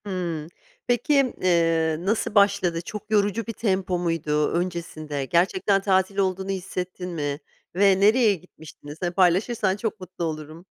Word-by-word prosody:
Hımm. 175 -6 -3 0.4
Peki, 255 +2 +2
eee, 165 -3 +2
nasıl 215 +4 -1
başladı, 200 -4 +3
çok 210 +4 -8
yorucu 205 +1 +1
bir 230 - -4
tempo 190 -4 0
muydu, 155 -3 0
öncesinde 165 -5 -3
gerçekten 190 +5 +2
tatil 190 0 +1
olduğunu 190 0 0
hissettin 180 -1 -4
mi 145 -4 -3 0.4
ve 195 0 +4
nereye 215 +1 +4
gitmiştiniz? 155 -3 -13
Hani 175 -1 -1
paylaşırsan 190 +3 +2
çok 220 +1 -4
mutlu 185 -2 -7
olurum. 155 +2 -6
185 Hz, 135 wpm, -24 LUFS, 165-200 Hz, 0.4 s, ve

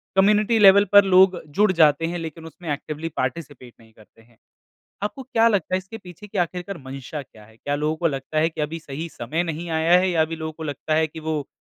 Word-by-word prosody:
Community 210 +3 +3
level 200 0 +7
पर 205 0 +9
लोग 185 -1 +4
जुड़ 205 +6 +3
जाते 160 -3 +3
हैं 175 +1 -3
लेकिन 165 0 -8
उसमें 165 +1 -10
एक्टिवली 155 +3 -5
पार्टिसिपेट 130 -2 -5
नहीं 110 -1 -21
करते 110 +1 -21
हैं। 115 0 -26 0.7
आपको 210 +6 -4
क्या 230 -3 +2
लगता 200 -5 0
है - - +2
इसके 190 +4 -9
पीछे 185 +1 -13
की - - -7
आखिरकार 180 +2 -2
मंशा 135 +3 -7
क्या 110 -5 -17
है? 110 +1 -21
क्या 145 +4 -3
लोगों 150 +2 -1
को 170 - +1
लगता 140 +1 -4
है 160 +1 +2
कि 160 - -6
अभी 155 +2 -3
सही 155 +1 -6
समय 155 +6 -3
नहीं 165 0 -5
आया 165 +2 +3
है 185 +1 +1
या 170 -3 +1
अभी 160 +1 -1
लोगों 160 -1 -5
को 160 - -9
लगता 155 +1 -3
है 160 0 +2
कि 160 +1 -10
वो 155 -2 -3
160 Hz, 235 wpm, -23 LUFS, 145-185 Hz, 0.7 s, पर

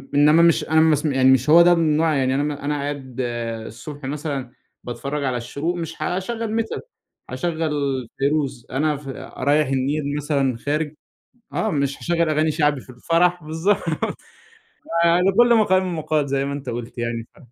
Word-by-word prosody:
إنّما 150 +3 +6
مش 170 -1 +4
أنا 160 0 +5
مس 155 -1 +3
يعني 130 -2 +4
مش 130 +2 +2
هو 170 +2 +8
ده 175 - +6
النوع 160 -1 +2
يعني 130 -1 +1
أنا 145 0 -2
أنا 150 +1 0
قاعد 140 -3 -5 0.5
الصبح 145 +4 -9
مثلًا 140 -3 -4 0.3
باتفرّج 140 +4 -4
على 130 -2 0
الشروق 145 +8 -3
مش 165 -2 -6
هاشغل 220 +7 -1
metal، 225 - -5 0.5
هاشغل 165 -3 -2 0.5
فيروز، 140 -3 0
أنا 150 +2 0
ف 140 - -12 0.3
رايح 145 +2 +2
النيل 140 +2 -1
مثلًا 140 -4 0
خارج 150 +4 -2 0.6
آه، 220 - 0
مش 140 -4 -1
هاشغل 170 -2 0
أغاني 155 +1 +2
شعبي 150 -3 +1
في - - -15
الفرح 170 +7 +1
بالضبط، 160 +6 +1 1.3
فلكُلّ 195 +8 +4
مقام 185 -5 +2
مقال 155 -2 0
زي 135 0 0
ما 140 - -3
أنت 140 -2 -6
قُلت 120 0 -6
يعني 115 -1 -3
ف - - -20
150 Hz, 160 wpm, -22 LUFS, 140-165 Hz, 1.3 s, هو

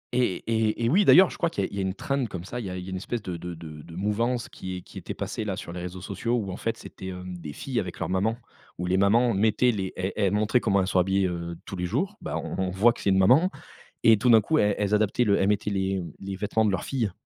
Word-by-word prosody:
Eh 120 -8 +1
eh 110 0 0
eh 115 - +3
oui, 195 +7 +4
d'ailleurs, 185 0 +7
je - - -9
crois 170 - +1
qu'il 165 - -2
y - - 0
a - - -15
il - - -7
y - - -3
a - - +1
une 95 0 -2
trend, 140 +2 -1
comme 90 -4 -6
ça. 120 +6 -6
il 105 - -5
y - - -4
a 90 - -5
il 90 - -5
y 90 - -10
a - - -6
une 95 - -3
espèce 110 +3 -4
de 90 - -4
de 85 +1 -6
de 80 -2 -9
de 85 +1 -12
mouvance 115 +5 0
qui 95 0 -7
est 90 - -7
qui - - -10
était - - -6
passée, - - -4
là, 100 -3 -2
sur 85 - -7
les 90 - -5
réseaux 90 +1 -6
sociaux 100 +5 -2
où 100 -6 -2
en - - -5
fait, - - -2
c'était, 95 - -10
hem, 90 -1 -6
des 75 -3 -7
filles 125 - -3
avec 90 -4 -4
leur - - -2
maman, 105 +5 +1 0.4
où 90 - -3
les 90 +1 +1
mamans 115 +5 +4
mettaient 110 +5 +3
les 95 -4 -3
elles 95 +2 -2
elles 100 -3 +1
montraient 105 +4 +2
comment 100 -4 +2
elles 95 - -1
sont 95 - +2
habillées, 95 +1 +2
heu, 85 -1 -4
tous - - -6
les 90 0 -2
jours. 185 - -1
Bah, - - -3
on - - -4
on 95 - 0
voit 100 +6 +4
que - - -11
c'est 100 - +1
une 95 - +4
maman 130 - +5 0.5
et 110 -2 +7
tout 120 +3 +3
d'un 110 - +7
coup, 155 +9 +1
elles 105 -6 +3
elles 105 0 +2
adaptaient 110 +3 +2
le 100 -2 +3
elles 95 - +2
mettaient 105 +1 +1
les, 95 -1 0
mmh, 85 -4 -7
les 95 0 -5
vêtements 105 +3 0
de 105 - +2
leurs 95 - -1
filles. 120 -7 -1
100 Hz, 315 wpm, -26 LUFS, 95-115 Hz, 0.5 s, d'ailleurs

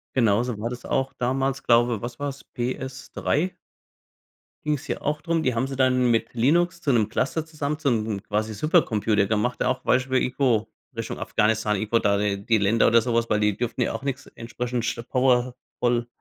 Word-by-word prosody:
Genau 115 -4 +3
so 125 -4 -3
war 115 - -2
das 120 0 -8
auch 135 0 -1
damals, 135 +2 0
glaube 120 -2 +3
was 120 0 -6
war's? 140 -1 -4
PS3? 135 +7 -2 1.1
Ging's 150 -2 -1
ja - - -2
auch 150 +1 -1
drum 165 -1 0
die 130 -2 +1
haben 125 +3 0
sie 135 -1 -6
dann 130 -2 +3
mit 115 +1 0
Linux 170 +8 +2
zu 145 - +1
‘nem 110 -4 +3
Cluster 160 +8 -1
zusammen, 150 -1 -3
zu 150 -3 +1
‘nem 110 -3 -1
quasi 110 +1 -2
Supercomputer 110 - +2
gemacht, 110 +4 0
auch 130 0 0
Beispiel 130 +1 +1
irgendwo 125 -4 +1 0.3
Richtung - - -4
Afghanistan, 105 -1 +1
irgendwo 110 +3 +1
da 100 -1 +2
die 100 -1 -1
die 115 -2 +3
Länder 105 +3 +3
oder 115 0 +5
sowas, 115 -1 0
weil 105 - +2
die 105 -1 +2
durften 120 +1 -3
ja - - 0
auch - - -5
nix 135 -1 -3
entsprechend 120 0 -4
sch 115 - -2
power 125 -1 +2 0.2
ful 120 -1 +1
120 Hz, 190 wpm, -24 LUFS, 110-135 Hz, 1.1 s, oder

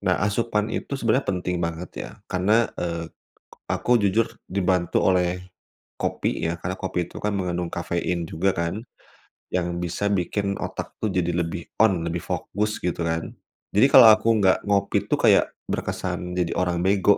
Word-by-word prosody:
Nah, - - +1
asupan 105 0 0
itu 140 - -3
sebenarnya 125 +2 +1
penting 90 -1 -1
banget, 85 +1 -3 0.2
ya. - - -12
Karena, 105 +5 +2 0.2
eee, 85 -1 -2 0.7
aku 120 -2 +2
jujur 105 +3 +3 0.2
dibantu 90 -2 +1
oleh 90 -1 +1 0.6
kopi - - -1
ya, 85 - -3
karena 90 +2 -3
kopi 90 -2 -2
itu - - -11
kan, 105 0 -1
mengandung 90 -2 -2
kafein 85 0 -2
juga 90 +4 0
kan, 85 +5 -2 0.7
yang 85 -1 -2
bisa 90 +3 -2
bikin 100 +2 -1
otak - - -5
itu 95 -4 +1
jadi 85 - -1
lebih 85 0 -4 0.2
on, 95 -7 +3
lebih 85 0 -2
fokus, 105 +2 -2
gitu 90 -1 -2
kan. 80 0 -2 0.4
Jadi, 105 +6 +6
kalau 120 -5 +9
aku 110 +1 0
nggak 95 -1 +5
ngopi, 100 -1 +1
itu - - +3
kayak, - - +4 0.2
berkesan 90 0 -3
jadi 85 -2 0
orang 90 -1 0
bego, 100 +1 +4
90 Hz, 160 wpm, -24 LUFS, 85-100 Hz, 0.7 s, kalau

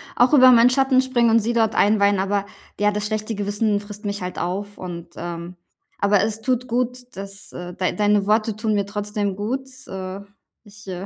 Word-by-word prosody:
auch 250 +5 +4
über 255 -2 +8
meinen 240 +1 +7
Schatten 265 0 +3
springen 240 -3 +2
und 230 +1 +5
sie 230 +3 -1
dort 225 -2 +1
einweihen, 200 -1 +3
aber 200 +1 0 0.3
ja, 210 0 +3
das 210 0 -3
schlechte 215 0 -3
Gewissen 205 +1 0
frisst 210 +1 -11
mich 200 -1 -3
halt 180 0 -5
auf 200 +4 -4
und, 170 -2 -7
ähm 170 +1 -6 0.5
aber 200 -1 +4
es 220 0 -2
tut 255 0 -1
gut, 250 +1 -3
dass, 195 +1 -9
äh 180 0 -7
dei 185 - 0
deine 205 -1 +2
Worte 215 0 +2
tun 215 0 -1
mir 200 -1 +1
trotzdem 205 -1 -3
gut, 255 +7 -3 0.2
äh. 190 0 -6 0.4
Ich, 205 -1 -16
äh, 185 0 -5
210 Hz, 195 wpm, -22 LUFS, 200-230 Hz, 0.5 s, über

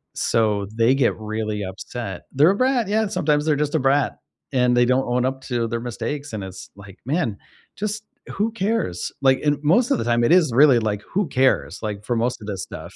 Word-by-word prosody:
so, 105 -3 +1
they 115 +4 +4
get 135 -3 +2
really 110 -1 -3
upset. 95 +1 -6
They're 150 +6 +5
a - - 0
brat, 255 -3 +1
yeah, 220 0 +1
sometimes 150 -5 +1
they're 155 -2 +2
just 150 +1 -1
a 160 - +3
brat, 135 +2 +1 0.3
and 125 -1 +3
they 120 - +5
don't 130 +2 +2
own 125 +1 +1
up 130 0 -2
to 120 -3 -1
their 115 +1 -3
mistakes, 140 +3 -5
and 100 -3 -4
it's 95 -1 -9
like, 100 -1 -14
"Man, 135 - -1 0.4
just 215 +1 -3 0.3
who 215 +3 -1
cares?" 195 - -2
Like, 130 -1 +4
in 145 -1 +1
most 230 +11 +3
of - - +3
the - - -1
time 120 0 +2
it - - +2
is 170 -8 +4
really 135 -3 +6
like, 105 -2 -2
"Who 195 -2 +1
cares?" 130 0 +1
Like, 105 -1 -4
for 120 - -1
most 120 +1 -1
of 105 - -9
this 100 -3 -4
stuff. 85 +3 -9
125 Hz, 220 wpm, -22 LUFS, 110-150 Hz, 0.4 s, really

